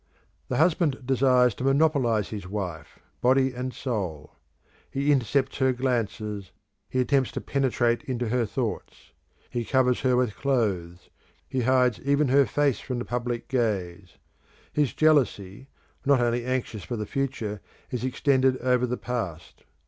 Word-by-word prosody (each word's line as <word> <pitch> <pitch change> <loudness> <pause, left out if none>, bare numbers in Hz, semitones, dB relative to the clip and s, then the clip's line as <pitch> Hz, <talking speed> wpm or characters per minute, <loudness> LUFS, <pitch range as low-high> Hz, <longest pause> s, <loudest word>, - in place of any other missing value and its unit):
The - - -2
husband 155 -5 +2
desires 125 -2 +4
to 125 - -7
monopolise 135 -7 +2
his 100 -4 -6
wife, 90 -7 -5 0.2
body 130 +1 +3
and 125 +1 -4
soul. 95 - -4 0.5
He 140 +2 +1
intercepts 135 0 +1
her 130 -1 +3
glances; 110 -6 -2 0.4
he 130 - -1
attempts 130 +1 +2
to - - -2
penetrate 120 -4 +1
into 120 -3 -2
her 120 -1 +1
thoughts. - - -5 0.4
He 120 - -2
covers 125 0 +2
her 130 -2 +2
with 125 -4 +1
clothes; 95 -10 -1 0.4
he 130 - -1
hides 125 -1 +3
even 140 0 +2
her 140 +1 +5
face 145 -6 +1
from 125 -2 -4
the 120 - -3
public 120 -1 -3
gaze. 100 -8 -2 0.6
His 150 -3 +1
jealousy, 130 -7 +2 0.4
not 140 -2 +4
only 120 0 0
anxious 125 -5 -2
for 120 - -4
the 105 - -3
future, 115 -6 -3 0.3
is 125 -2 -3
extended 130 0 +2
over 125 0 +1
the, 125 +1 -2
past. 90 - -5
125 Hz, 145 wpm, -26 LUFS, 110-135 Hz, 0.6 s, her